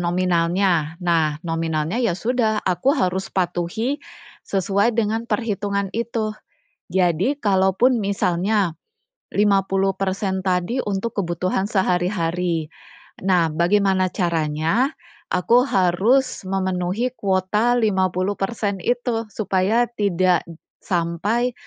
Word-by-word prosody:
nominalnya. 175 Hz, -1 st, +1 dB
Nah, 160 Hz, -3 st, +2 dB
nominalnya 165 Hz, +4 st, -1 dB
ya 225 Hz, -8 st, +1 dB
sudah, 220 Hz, +1 st, 0 dB
aku 190 Hz, -, +1 dB
harus 190 Hz, +1 st, 0 dB
patuhi 190 Hz, -, -2 dB, 0.5 s
sesuai 200 Hz, +4 st, +1 dB
dengan 225 Hz, +1 st, 0 dB
perhitungan 200 Hz, -4 st, -1 dB
itu. 225 Hz, -1 st, -2 dB, 0.6 s
Jadi 185 Hz, -, +1 dB
kalaupun 205 Hz, +2 st, +2 dB
misalnya, 195 Hz, -1 st, 0 dB, 0.6 s
50% 195 Hz, -1 st, +1 dB
tadi 185 Hz, +7 st, 0 dB
untuk 205 Hz, +2 st, -2 dB
kebutuhan 185 Hz, +2 st, -1 dB
sehari-hari. 180 Hz, -4 st, 0 dB, 0.6 s
Nah, 175 Hz, -4 st, +2 dB
bagaimana 185 Hz, +2 st, +2 dB
caranya 170 Hz, -, 0 dB, 0.4 s
aku 235 Hz, +7 st, +3 dB
harus 210 Hz, +9 st, +2 dB
memenuhi 190 Hz, +5 st, -1 dB
kuota 200 Hz, +5 st, +1 dB
50% 200 Hz, 0 st, 0 dB
itu, 240 Hz, 0 st, -1 dB
supaya 200 Hz, +3 st, +1 dB
tidak 185 Hz, -4 st, +2 dB
d 165 Hz, -, -10 dB, 0.3 s
sampai 190 Hz, +8 st, 0 dB
190 Hz, 90 wpm, -22 LUFS, 175-215 Hz, 0.6 s, aku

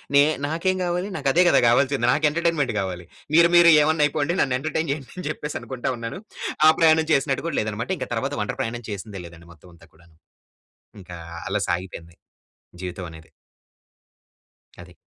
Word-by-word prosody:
నే 140 Hz, -, +7 dB, 0.2 s
నాకేం 170 Hz, +5 st, 0 dB
కావాలి 175 Hz, +2 st, -2 dB
నాకు 140 Hz, -2 st, 0 dB
అదే 180 Hz, -, +5 dB
కదా! -, -, +5 dB
కావాల్సింది 130 Hz, +1 st, +2 dB
నాకు 150 Hz, +4 st, +2 dB
ఎంటర్టైన్మెంట్ 165 Hz, -4 st, 0 dB
కావాలి. 90 Hz, -2 st, -4 dB, 0.3 s
మీరు 170 Hz, +1 st, +6 dB
మీరు 170 Hz, -1 st, +8 dB
ఏమైనా 155 Hz, 0 st, +2 dB
అయిపోండి 150 Hz, +3 st, -1 dB
నన్ను 130 Hz, -2 st, +1 dB
ఎంటర్టైన్ 160 Hz, +2 st, -2 dB
చేయండి 140 Hz, -2 st, -5 dB
అని 180 Hz, -, -5 dB
చెప్పేసి 150 Hz, -1 st, -5 dB
అనుకుంటా 130 Hz, -1 st, -4 dB
ఉన్నాను. 115 Hz, +7 st, -6 dB, 0.5 s
ఆ -, -, +9 dB
ప్రయాణం 160 Hz, -1 st, +4 dB
చేసినట్టు 140 Hz, +1 st, 0 dB
కూడా 165 Hz, -, -3 dB
లేదన్నమాట. 110 Hz, +1 st, -4 dB
ఇంక -, -, -5 dB
తర్వాత -, -, -2 dB
వంట -, -, -2 dB
ప్రయాణం 120 Hz, +1 st, -4 dB
చేసిందే 100 Hz, -1 st, -7 dB
లేదండి 85 Hz, 0 st, -16 dB
మొత్తం 85 Hz, +2 st, -19 dB
అంతా 85 Hz, 0 st, -19 dB
కూడాను. 80 Hz, 0 st, -23 dB, 0.9 s
ఇంకా 90 Hz, -1 st, -10 dB, 0.3 s
అలా -, -, -1 dB
సాగిపోయింది 85 Hz, -2 st, -5 dB, 0.7 s
జీవితం 90 Hz, 0 st, -6 dB
అనేది. 80 Hz, 0 st, -14 dB, 1.5 s
అది. -, -, -15 dB
135 Hz, 165 wpm, -23 LUFS, 95-160 Hz, 1.5 s, ఆ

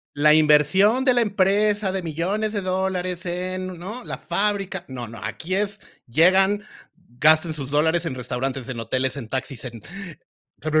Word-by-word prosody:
La 150 Hz, +1 st, +5 dB
inversión 155 Hz, -, +4 dB
de 255 Hz, -, +5 dB
la 240 Hz, -, +3 dB
empresa, 205 Hz, 0 st, +2 dB
de 190 Hz, -1 st, -2 dB
millones 190 Hz, +7 st, -2 dB
de 205 Hz, -, -1 dB
dólares 185 Hz, -1 st, -2 dB
en, 185 Hz, 0 st, -4 dB
¿no? 215 Hz, +8 st, -7 dB
La -, -, -5 dB
fábrica. 195 Hz, -3 st, -1 dB
No, 125 Hz, -3 st, -7 dB
no, 115 Hz, 0 st, -10 dB
aquí 160 Hz, +12 st, -4 dB
es 205 Hz, +1 st, -1 dB, 0.3 s
llegan, 190 Hz, -, +4 dB, 0.6 s
gastan 155 Hz, +2 st, +4 dB
sus 140 Hz, -3 st, -5 dB
dólares 160 Hz, +4 st, +2 dB
en 165 Hz, -6 st, -3 dB
restaurantes, 130 Hz, +1 st, -4 dB
en 125 Hz, -3 st, -5 dB
hoteles, 130 Hz, +4 st, -1 dB
en 120 Hz, -5 st, -7 dB
taxis, 130 Hz, -1 st, -4 dB
en 115 Hz, -3 st, -7 dB, 0.8 s
pero, 155 Hz, 0 st, +2 dB
175 Hz, 160 wpm, -23 LUFS, 140-195 Hz, 0.8 s, La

